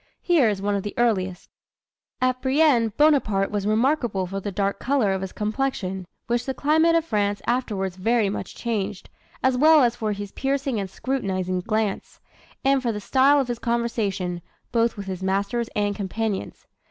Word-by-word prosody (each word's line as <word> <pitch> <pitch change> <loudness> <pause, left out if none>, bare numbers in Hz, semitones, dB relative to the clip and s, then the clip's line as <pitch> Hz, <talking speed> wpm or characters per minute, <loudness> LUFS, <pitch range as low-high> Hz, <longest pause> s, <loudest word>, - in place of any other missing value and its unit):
Here 315 -10 +4
is 200 -2 -3
one 205 0 +1
of 200 - 0
the 205 - -6
earliest: 190 -6 0 0.7
"At 255 0 +1
Brienne, 265 -4 +3
Bonaparte 265 -10 +3
was 205 -1 -1
remarkable 230 -3 +1
for 195 +2 -4
the 205 +1 -4
dark 200 +1 -1
color 250 -7 +1
of 190 - -2
his 190 -1 -5
complexion, 210 -5 -2 0.2
which 240 +1 -1
the 265 - -2
climate 320 +3 +3
of 330 -1 +2
France 205 -6 0
afterwards 205 -7 -1
very 225 +2 +2
much 195 - -5
changed, 210 -4 -3 0.3
as 260 -1 +3
well 310 0 +7
as 240 -1 +2
for 220 -3 -2
his 200 -1 -6
piercing 270 -3 -1
and 195 -1 -4
scrutinising 185 -7 -2
glance, 215 +1 -2 0.5
and 275 0 +4
for 240 -2 0
the 210 - -4
style 270 +7 +4
of 270 - 0
his 240 -1 -3
conversation, 205 -7 -1 0.3
both 230 -1 +1
with 200 - -6
his 190 -1 -5
masters 200 +5 -1
and 205 -1 0
companions. 205 +1 -3
220 Hz, 175 wpm, -24 LUFS, 195-255 Hz, 0.7 s, well